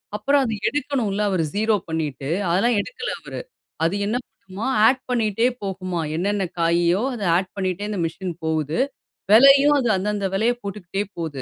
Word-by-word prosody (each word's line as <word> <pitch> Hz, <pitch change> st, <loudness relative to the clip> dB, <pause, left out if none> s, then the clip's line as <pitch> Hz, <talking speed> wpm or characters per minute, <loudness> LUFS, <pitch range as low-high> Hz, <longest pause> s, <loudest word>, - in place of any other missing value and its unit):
அப்புறம் 280 Hz, +7 st, +2 dB
அத 225 Hz, -4 st, -1 dB
எடுக்கணுல 255 Hz, -8 st, -1 dB
அவரு 185 Hz, -4 st, +1 dB
0 215 Hz, +1 st, +2 dB
பண்ணிட்டு 150 Hz, -4 st, -3 dB, 0.2 s
அதெல்லாம் 200 Hz, +8 st, +2 dB
எடுக்கல 470 Hz, -, -4 dB
அவரு. -, -, -7 dB, 0.4 s
அது 165 Hz, +4 st, +1 dB
என்ன 220 Hz, +4 st, 0 dB
பண்ணுமாம், 205 Hz, +8 st, -5 dB
ஆட் 260 Hz, +1 st, +2 dB
பண்ணிட்டே 230 Hz, -1 st, +1 dB, 0.2 s
போகுமாம். 185 Hz, -4 st, -3 dB
என்னன்ன 200 Hz, +3 st, 0 dB, 0.2 s
காயோ 170 Hz, +3 st, +2 dB
அத 220 Hz, -, -5 dB
ஆட் 185 Hz, 0 st, -2 dB
பண்ணிட்டே 190 Hz, +1 st, -2 dB
இந்த 205 Hz, -4 st, -3 dB
மிசின் 175 Hz, +2 st, -4 dB
போகுது. 155 Hz, -, -1 dB, 0.5 s
விலையும் 275 Hz, +5 st, +7 dB
அது 245 Hz, -3 st, 0 dB
அந்த 190 Hz, +2 st, -3 dB
அந்த 200 Hz, -1 st, -1 dB
விலைய 230 Hz, +5 st, +2 dB
போட்டுக்குட்டே 200 Hz, -1 st, -4 dB, 0.2 s
போது. 145 Hz, -5 st, -4 dB
200 Hz, 160 wpm, -22 LUFS, 175-235 Hz, 0.5 s, விலையும்